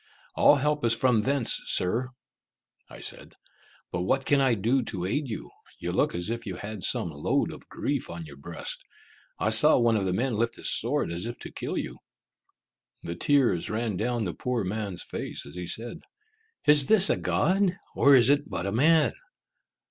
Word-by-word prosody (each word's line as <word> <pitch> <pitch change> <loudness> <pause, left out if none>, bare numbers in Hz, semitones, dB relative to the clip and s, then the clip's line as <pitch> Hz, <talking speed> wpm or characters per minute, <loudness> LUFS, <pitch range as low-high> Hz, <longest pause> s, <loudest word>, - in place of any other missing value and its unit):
"All - - +6
help 150 +1 0
is 115 0 +3
from 125 -2 +2
thence, 130 +2 +1
Sir," 115 +8 +1 0.8
I - - -12
said; - - -8 0.6
"but 90 - -2
what 130 +9 0
can 140 -1 +3
I 130 -3 +3
do 115 +6 +1
to 95 -6 -5
aid 135 +8 -2
you? 110 - -6 0.3
You - - -4
look - - 0
as 90 +5 -3
if 115 0 -4
you 95 - -4
had 105 +2 -7
some - - 0
load - - -1
of - - -12
grief 140 -2 -3
on 85 -1 -7
your 70 -2 -12
breast. 85 +4 -6 0.6
I 110 - 0
saw 130 +8 +5
one 120 -2 +3
of 100 -3 0
the 95 - 0
men 125 +6 0
lift 115 +2 -1
his - - +1
sword - - 0
as 85 +6 -3
if 120 - -6
to - - -8
kill - - -4
you." - - -5 1.0
The 85 - -4
tears 120 - +2
ran 110 -1 -2
down 115 +2 -1
the 85 - -3
poor 125 +1 -2
man's 100 -2 -4
face, - - -5
as 70 - -11
he 90 -1 -6
said, 115 +6 -5 0.7
"Is 145 -2 +6
this 215 -3 +7
a - - +2
god, 190 0 +1 0.2
or 140 0 +6
is 125 +1 +5
it 145 +1 +1
but 90 - -4
a 100 - -2
man?" 155 +8 +3
115 Hz, 195 wpm, -27 LUFS, 95-135 Hz, 1.0 s, this